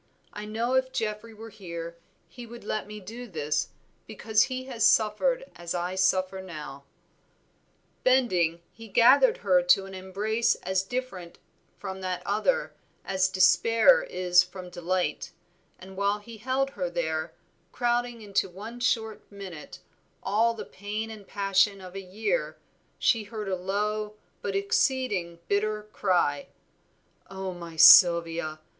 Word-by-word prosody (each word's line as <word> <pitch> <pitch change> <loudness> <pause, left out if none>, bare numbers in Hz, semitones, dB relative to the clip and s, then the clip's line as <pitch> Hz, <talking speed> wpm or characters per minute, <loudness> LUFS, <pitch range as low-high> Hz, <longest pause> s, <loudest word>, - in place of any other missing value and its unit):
I 210 - -7
know 225 +4 -2
if 260 0 +1
Geoffrey 215 0 -3
were 225 +1 -10
here, 170 -5 -7 0.3
he 240 -2 -11
would 235 +1 -11
let 215 0 -3
me 210 0 -8
do 230 +6 -9
this, 150 -5 -2 0.4
because 220 0 +1
he 255 0 -5
has 250 -4 -4
suffered 365 - +3
as 175 0 -5
I 175 +1 -2
suffer 190 0 +1
now." 150 -6 -9 1.2
Bending, 180 -11 +2
he 225 0 -12
gathered 255 +5 +5
her 180 -2 +5
to 180 +2 +3
an 195 - -10
embrace 210 +5 0
as 190 +1 0
different 195 -5 -6 0.4
from 190 -1 -7
that 185 -1 -3
other 485 - 0 0.3
as 190 0 +1
despair 225 - +5
is 180 - +3
from 185 0 -8
delight, 180 +1 -2 0.4
and 190 +1 -12
while 200 +1 +1
he 220 +2 -12
held 260 +4 -1
her 185 -8 -3
there, 160 -2 -3 0.4
crowding 240 -1 -1
into 200 -2 -1
one 215 +7 -9
short 220 -3 -1
minute, 190 -6 -10 0.4
all 225 +4 +2
the 220 - -7
pain 210 +3 -5
and 210 -3 -11
passion 200 0 +1
of 185 -1 -11
a 195 - -6
year, 215 - -2 0.4
she 225 -3 +2
heard 215 -1 -6
a 190 - 0
low, 210 +3 -2 0.3
but 200 -1 -3
exceeding 200 -3 0
bitter 210 +1 0
cry 175 -7 +1 0.8
"Oh, 190 -1 -5
my 170 -2 -9
Sylvia! 165 -1 +6
200 Hz, 140 wpm, -27 LUFS, 180-225 Hz, 1.2 s, Sylvia